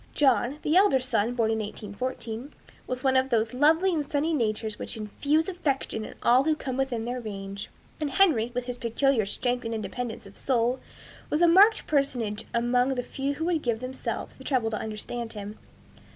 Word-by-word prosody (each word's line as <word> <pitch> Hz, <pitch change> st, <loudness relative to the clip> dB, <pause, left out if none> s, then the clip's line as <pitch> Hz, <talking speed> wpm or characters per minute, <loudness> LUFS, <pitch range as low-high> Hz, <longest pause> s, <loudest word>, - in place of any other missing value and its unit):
John, 265 Hz, -1 st, +3 dB
the 305 Hz, -, +1 dB
elder 375 Hz, -8 st, +5 dB
son, 245 Hz, -2 st, 0 dB
born 225 Hz, -2 st, +2 dB
in 220 Hz, -, 0 dB
1814 225 Hz, +4 st, -5 dB, 0.4 s
was 255 Hz, 0 st, -4 dB
one 265 Hz, -1 st, +3 dB
of 260 Hz, 0 st, +3 dB
those 225 Hz, -2 st, +1 dB
lovely 320 Hz, +8 st, +4 dB
and 310 Hz, -3 st, 0 dB
sunny 305 Hz, +3 st, +1 dB
natures 220 Hz, -5 st, -1 dB
which -, -, -5 dB
infuse 285 Hz, -, 0 dB
affection 280 Hz, -, -2 dB
in -, -, -9 dB
all 250 Hz, +3 st, +5 dB
who 315 Hz, -1 st, +3 dB
come 265 Hz, -4 st, -4 dB
within 255 Hz, -4 st, -1 dB
their 250 Hz, +1 st, -3 dB
range; 200 Hz, -2 st, -6 dB, 0.3 s
and 300 Hz, -2 st, -1 dB
Henry, 265 Hz, -, +3 dB
with 250 Hz, -, -1 dB
his 245 Hz, -1 st, -5 dB
peculiar 235 Hz, -1 st, +1 dB
strength 245 Hz, +4 st, -1 dB
and 225 Hz, 0 st, -3 dB
independence 225 Hz, +1 st, -5 dB
of 200 Hz, -, -13 dB
soul, 245 Hz, -1 st, +1 dB, 0.5 s
was 300 Hz, -, +1 dB
a -, -, +7 dB
marked 400 Hz, +6 st, +6 dB
personage 250 Hz, -8 st, 0 dB
among 245 Hz, +3 st, +2 dB
the 245 Hz, -, -2 dB
few 275 Hz, +3 st, -3 dB
who 320 Hz, -, -3 dB
would 335 Hz, -3 st, +1 dB
give 235 Hz, -4 st, 0 dB
themselves 255 Hz, +1 st, -5 dB
the -, -, -12 dB
trouble 245 Hz, -5 st, 0 dB
to 215 Hz, -, -1 dB
understand 225 Hz, +2 st, -5 dB
him. 210 Hz, 0 st, -7 dB
250 Hz, 190 wpm, -27 LUFS, 225-280 Hz, 0.5 s, a